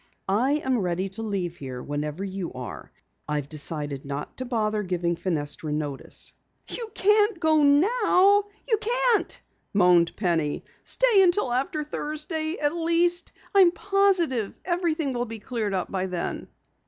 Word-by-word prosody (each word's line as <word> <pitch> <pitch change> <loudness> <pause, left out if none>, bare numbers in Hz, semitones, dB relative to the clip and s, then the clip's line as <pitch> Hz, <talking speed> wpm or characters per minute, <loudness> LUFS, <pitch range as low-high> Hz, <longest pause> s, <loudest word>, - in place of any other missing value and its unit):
"I 230 +8 +2
am 260 -2 +1
ready 185 0 -1
to 200 +4 -7
leave 190 -6 -3
here 130 -3 -7
whenever 150 +4 -4
you 190 -3 -4
are. 125 -1 -8 0.4
I've 150 -2 -1
decided 145 -2 -2
not 140 +1 -6
to 255 - -4
bother 215 -3 0
giving 175 -3 -1
Fenestra 155 -3 -3
notice." 150 -2 -3 0.3
"You 460 -2 -5
can't 420 -1 +3
go 315 -2 +3
now. 395 +6 +4 0.2
You 445 - +3
can't!" 480 0 +1 0.4
moaned 180 -3 +4
Penny. 165 -7 -1 0.2
"Stay 485 -6 +4
until 350 -8 +3
after 275 +4 -1
Thursday, 310 +2 -3
at 290 0 +1
least. 340 +1 +2 0.2
I'm 380 -3 +7
positive 360 - +1
everything 335 -5 0
will 245 0 -1
be 225 -1 -7
cleared 215 -2 -3
up 185 - -3
by 190 -1 -1
then." 180 -2 -4
240 Hz, 140 wpm, -25 LUFS, -, 0.4 s, I'm